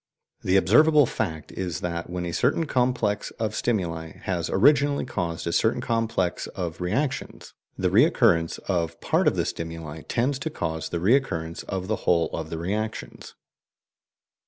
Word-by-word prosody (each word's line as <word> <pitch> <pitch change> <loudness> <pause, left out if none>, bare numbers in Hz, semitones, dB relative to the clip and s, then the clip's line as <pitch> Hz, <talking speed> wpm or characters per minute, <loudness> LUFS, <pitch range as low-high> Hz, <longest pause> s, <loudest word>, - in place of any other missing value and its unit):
The 95 +1 +3
observable 145 - +5
fact 80 -9 -4
is 90 -5 -4
that, 85 -1 -3
when 90 0 -3
a 85 - -3
certain 165 - +1
complex 125 -6 0
of 110 -2 -2
stimuli 85 -9 -2
has 90 -3 -2
originally 145 +7 +3
caused 85 -9 -3
a 85 - -1
certain 110 - +2
complex 115 -6 -1
of 85 -2 -5
reactions, 130 +10 -2 0.2
the - - 0
recurrence 80 -1 +4
of 85 -4 -1
part - - +1
of - - +3
the - - 0
stimuli 80 -2 -5
tends 130 +3 0
to 160 - -3
cause 80 - -3
the 85 - -2
recurrence 85 -6 +1
of 95 -1 -4
the - - 0
whole 85 -2 +1
of 80 -1 -4
the 80 - -4
reactions. 105 +6 -4
90 Hz, 155 wpm, -25 LUFS, 85-120 Hz, 0.2 s, observable